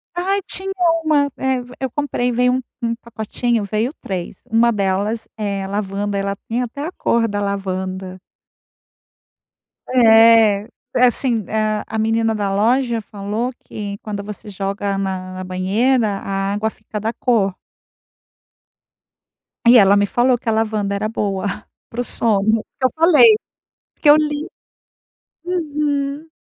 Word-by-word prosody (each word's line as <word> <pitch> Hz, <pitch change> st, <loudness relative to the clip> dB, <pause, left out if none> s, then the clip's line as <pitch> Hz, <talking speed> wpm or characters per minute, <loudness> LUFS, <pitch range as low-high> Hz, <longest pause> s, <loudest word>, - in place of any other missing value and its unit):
Ai 385 Hz, +3 st, 0 dB
tinha 385 Hz, +1 st, -2 dB, 0.3 s
uma, 290 Hz, -3 st, +2 dB
eh, 265 Hz, -1 st, 0 dB
ve 245 Hz, 0 st, -12 dB
eu 265 Hz, -, -2 dB
comprei, 250 Hz, -3 st, -1 dB
veio 250 Hz, +1 st, +2 dB
um 260 Hz, -, 0 dB, 0.2 s
um 230 Hz, 0 st, 0 dB
pacotinho, 235 Hz, 0 st, -2 dB
veio 215 Hz, +5 st, -1 dB
3. 180 Hz, -1 st, -5 dB
Uma 230 Hz, +1 st, +4 dB
delas 200 Hz, +2 st, -1 dB
é 200 Hz, -2 st, -3 dB
lavanda, 200 Hz, 0 st, -2 dB
ela 200 Hz, 0 st, -1 dB
tinha 240 Hz, +2 st, 0 dB
até 280 Hz, +5 st, -7 dB
a 325 Hz, -, -4 dB
cor 235 Hz, -9 st, +1 dB
da 205 Hz, -1 st, -3 dB
lavanda. 190 Hz, -2 st, -3 dB, 1.7 s
É 225 Hz, -3 st, +6 dB, 0.3 s
é 250 Hz, -, +5 dB
assim 240 Hz, -3 st, +1 dB
a 215 Hz, -1 st, 0 dB
a 220 Hz, -, -4 dB
menina 225 Hz, 0 st, +1 dB
da 200 Hz, -2 st, -1 dB
loja 235 Hz, +3 st, +2 dB
falou 210 Hz, +4 st, -4 dB
que 200 Hz, -1 st, -6 dB
quando 205 Hz, -2 st, -5 dB
você 210 Hz, +1 st, -9 dB
joga 195 Hz, 0 st, -3 dB
na 185 Hz, -1 st, -3 dB
na 185 Hz, -, -5 dB
banheira, 210 Hz, +7 st, +1 dB
a 195 Hz, 0 st, -2 dB
água 210 Hz, +2 st, 0 dB
fica 215 Hz, -1 st, -8 dB
da 225 Hz, +2 st, -2 dB
cor. 210 Hz, -8 st, +1 dB, 2.1 s
E 245 Hz, -, +9 dB
ela 195 Hz, 0 st, +5 dB
me 205 Hz, -, +2 dB
falou 245 Hz, 0 st, +4 dB
que 230 Hz, -, -2 dB
a -, -, +3 dB
lavanda 215 Hz, -2 st, -1 dB
era 210 Hz, +2 st, -1 dB
boa 200 Hz, -3 st, -2 dB, 0.4 s
para 240 Hz, -, -3 dB
o -, -, -1 dB
sono, 220 Hz, -2 st, +1 dB
que 260 Hz, -, 0 dB
eu -, -, +4 dB
falei 360 Hz, +7 st, +7 dB, 0.6 s
porque 295 Hz, -, +4 dB
eu 295 Hz, -, +9 dB
li 300 Hz, 0 st, -1 dB, 1.0 s
uhum. 300 Hz, -3 st, -2 dB
220 Hz, 145 wpm, -19 LUFS, 200-250 Hz, 2.1 s, E